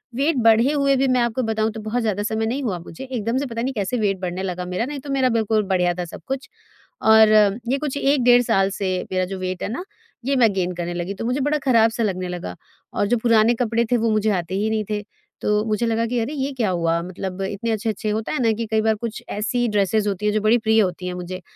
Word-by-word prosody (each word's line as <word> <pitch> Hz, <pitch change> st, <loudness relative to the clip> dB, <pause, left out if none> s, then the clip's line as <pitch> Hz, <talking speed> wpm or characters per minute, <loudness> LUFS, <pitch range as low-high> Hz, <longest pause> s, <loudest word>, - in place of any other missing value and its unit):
Wait 285 Hz, +4 st, +1 dB
बढ़े 230 Hz, +5 st, +5 dB
हुए 280 Hz, -2 st, +2 dB
भी 265 Hz, +1 st, +2 dB
मैं 255 Hz, -1 st, +2 dB
आपको 235 Hz, +2 st, 0 dB
बताऊँ 220 Hz, 0 st, 0 dB
तो 220 Hz, -, -7 dB
बहुत 225 Hz, +3 st, -2 dB
ज़्यादा 205 Hz, -2 st, -1 dB
समय 220 Hz, +1 st, -1 dB
नहीं 255 Hz, +5 st, -2 dB
हुआ 200 Hz, -8 st, -1 dB
मुझे। 170 Hz, +7 st, -10 dB
एकदम 245 Hz, -2 st, -2 dB
से 280 Hz, -, -1 dB
पता 230 Hz, -2 st, -4 dB
नहीं 265 Hz, +1 st, -2 dB
कैसे 210 Hz, +2 st, -2 dB
वेट 195 Hz, -3 st, 0 dB
बढ़ने 185 Hz, 0 st, -4 dB
लगा 180 Hz, -1 st, -3 dB
मेरा। 180 Hz, +6 st, -2 dB
नहीं 285 Hz, 0 st, -5 dB
तो 280 Hz, -, -10 dB
मेरा 265 Hz, -2 st, +2 dB
बिल्कुल 220 Hz, -2 st, +1 dB
बढ़िया 180 Hz, -2 st, +2 dB
था 180 Hz, -, -3 dB
सब 170 Hz, -, -10 dB
कुछ 270 Hz, 0 st, -4 dB, 0.6 s
और 220 Hz, -1 st, +8 dB, 0.4 s
ये 270 Hz, -, +2 dB
कुछ 290 Hz, -2 st, -3 dB
1 275 Hz, -2 st, +2 dB
डेढ़ 245 Hz, 0 st, +6 dB
साल 195 Hz, -3 st, +2 dB
से 190 Hz, -1 st, -2 dB, 0.2 s
मेरा 185 Hz, 0 st, +1 dB
जो 190 Hz, +1 st, -6 dB
वेट 185 Hz, 0 st, -4 dB
है -, -, -2 dB
ना, 250 Hz, +11 st, -4 dB, 0.4 s
ये 275 Hz, +1 st, +1 dB
मैं 230 Hz, -5 st, +4 dB
गेन 180 Hz, -1 st, -1 dB
करने 175 Hz, 0 st, -3 dB
लगी। 175 Hz, +3 st, -3 dB
तो 200 Hz, -, -6 dB
मुझे 250 Hz, +4 st, 0 dB
बड़ा 290 Hz, +3 st, +1 dB
खराब-सा 230 Hz, -2 st, +3 dB
लगने 185 Hz, -3 st, -2 dB
लगा 170 Hz, -, -5 dB, 0.4 s
और 205 Hz, -, 0 dB
जो 240 Hz, +3 st, +2 dB
पुराने 230 Hz, -1 st, +4 dB
कपड़े 235 Hz, 0 st, +1 dB
थे, -, -, +4 dB
वो 230 Hz, 0 st, +1 dB
मुझे 215 Hz, 0 st, +1 dB
आते 185 Hz, 0 st, -2 dB
ही 210 Hz, +2 st, 0 dB
नहीं 220 Hz, -1 st, 0 dB
थे। 210 Hz, 0 st, -1 dB, 0.4 s
तो 210 Hz, 0 st, +1 dB
मुझे 215 Hz, +1 st, 0 dB
लगा 230 Hz, 0 st, +1 dB
कि, 245 Hz, +1 st, -1 dB
"अरे! 235 Hz, +6 st, -2 dB
ये 275 Hz, -1 st, -2 dB
क्या 235 Hz, -6 st, 0 dB
हुआ?" 170 Hz, -2 st, 0 dB
मतलब 185 Hz, +1 st, -6 dB
इतने 205 Hz, +4 st, -3 dB
अच्छे-अच्छे 215 Hz, -1 st, -2 dB
होता 220 Hz, +1 st, -2 dB
है 305 Hz, -, -1 dB
ना 225 Hz, -, +4 dB
कि 230 Hz, +1 st, -3 dB
कई 220 Hz, 0 st, +3 dB
बार 220 Hz, 0 st, +2 dB
कुछ 230 Hz, -2 st, -5 dB
ऐसी 240 Hz, +3 st, -1 dB
ड्रेसेस 210 Hz, 0 st, +1 dB
होती 200 Hz, 0 st, -2 dB
हैं 210 Hz, -, +2 dB
जो 215 Hz, -, +1 dB
बड़ी 215 Hz, +3 st, +4 dB
प्रिय 220 Hz, -1 st, +3 dB
होती 180 Hz, -1 st, -2 dB
हैं 180 Hz, -, -3 dB
मुझे, 180 Hz, +1 st, -6 dB
220 Hz, 260 wpm, -22 LUFS, 190-240 Hz, 0.6 s, और